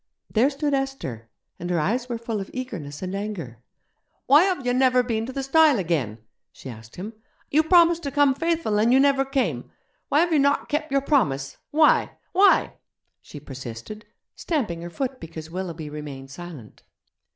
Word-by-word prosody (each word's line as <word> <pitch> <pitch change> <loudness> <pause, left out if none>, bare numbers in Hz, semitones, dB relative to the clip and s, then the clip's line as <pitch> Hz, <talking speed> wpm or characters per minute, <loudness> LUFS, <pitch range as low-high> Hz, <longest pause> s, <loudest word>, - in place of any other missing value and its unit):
There 235 +5 +3
stood 290 0 -2
Esther, 270 - -3 0.3
and 175 - -5
her 175 -2 +1
eyes 240 +10 -1
were 235 - -2
full 225 -2 -4
of 195 - -7
eagerness 185 - -6
and 185 0 -4
anger. 195 - -5 0.7
'Why 295 +6 +6
have 360 -9 -1
you 245 - +1
never 255 -1 +4
been 225 -2 -2
to - - -5
the 270 +1 -4
stile 305 0 +5
again?' 155 - -1 0.3
she 130 - -9
asked 110 0 -13
him. 205 +5 -7 0.4
'You 305 - +5
promised 340 +1 +5
to 280 - -4
come 285 -1 +4
faithful, 325 -8 0
and 225 +3 +3
you 260 - +6
never 275 -1 +4
came. 250 - -2 0.4
Why 295 - +4
have 345 -1 +1
you 305 - +4
not 280 +1 +2
kep' 300 0 -2
your 275 0 +2
promise? 140 - 0
Why? 305 0 +3
Why?' 395 +2 +4 0.5
she 150 - -11
persisted, 135 - -9 0.3
stamping 220 - -2
her 170 - -6
foot 260 +7 -4
because 160 -1 -9
Willoughby 170 -4 -5
remained 145 -3 -8
silent. 155 -8 -10
230 Hz, 175 wpm, -24 LUFS, -, 0.7 s, Why